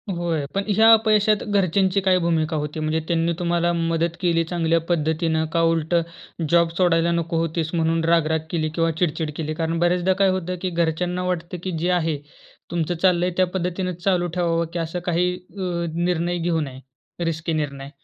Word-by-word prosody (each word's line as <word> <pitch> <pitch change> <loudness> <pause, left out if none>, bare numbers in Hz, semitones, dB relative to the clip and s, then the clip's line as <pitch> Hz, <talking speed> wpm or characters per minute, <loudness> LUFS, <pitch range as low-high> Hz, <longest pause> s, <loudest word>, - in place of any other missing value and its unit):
होय. 170 -4 -1
पण 195 - +1
ह्या 220 +3 +6
अपयशात 215 -1 +3
घरच्यांची 195 -1 +2
काय 190 -1 +3
भूमिका 165 -2 0
होती? 150 +1 -4
म्हणजे 155 +1 0
त्यांनी 170 0 +1
तुम्हाला 175 0 +1
मदत 165 0 0
केली 170 -2 +2
चांगल्या 165 -1 +1
पद्धतीनं, 160 -1 +1
का 170 - +2
उलटं 165 +1 +2 0.5
जॉब 170 0 +4
सोडायला 170 -2 +3
नको 170 0 -1
होतीस, 165 0 -1
म्हणून 165 0 +1
राग, 165 -1 +3
राग 160 0 +1
केली 155 -2 0
किंवा 165 -1 +2
चिडचिड 160 -2 0
केली. 155 -1 -3
कारण 165 +1 -2
बऱ्याचदा 180 +2 +2
काय 195 - +5
होतं? 185 -1 -2
की 185 - -1
घरच्यांना 175 +1 -1
वाटतं 180 0 -3
की 185 - -2
जे 175 +3 0
आहे 165 -4 +1 0.5
तुमचं 170 0 -1
चाललं 175 0 +2
आहे, 180 - -1
त्या 185 -1 +3
पद्धतीनं 180 0 -2
चालू 180 -3 +2
ठेवावं. 170 -1 +1
की 170 - -2
असं 165 +2 -3
काही 180 +1 +1
अ, 180 +2 -11 0.3
निर्णय 175 0 0
घेऊ 165 -1 0
नये, 135 -3 -6 0.5
रिस्की 165 0 -2
निर्णय. 140 -3 -3
170 Hz, 180 wpm, -22 LUFS, 165-180 Hz, 0.5 s, ह्या